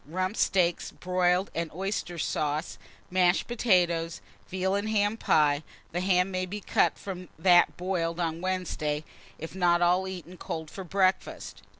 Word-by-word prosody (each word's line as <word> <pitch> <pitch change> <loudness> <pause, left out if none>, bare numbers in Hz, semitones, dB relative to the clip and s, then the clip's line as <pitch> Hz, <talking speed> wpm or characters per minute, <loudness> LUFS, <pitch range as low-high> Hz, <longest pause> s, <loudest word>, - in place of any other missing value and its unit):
Rump 185 +5 -2
steaks, 175 -5 +1
broiled, 180 +1 0
and 165 -1 -3
oyster 190 -2 -3
sauce, 150 0 -2 0.3
mashed 180 -1 +3
potatoes; 175 -8 +1 0.3
veal 190 +1 -1
and 200 +2 -1
ham 205 0 +2
pie, 150 -8 +3 0.3
the 175 - -2
ham 185 0 +2
may 185 0 -2
be 205 +3 -5
cut - - +1
from 185 -3 -7
that 175 +1 +5
boiled 175 -2 -2
on 165 -1 -2
Wednesday, 170 -5 -2 0.3
if 160 - -7
not 175 -2 +3
all 180 +2 +3
eaten 185 -1 -8
cold 160 -1 -6
for 195 - -7
breakfast. 185 +1 -1
180 Hz, 145 wpm, -28 LUFS, 170-190 Hz, 0.3 s, that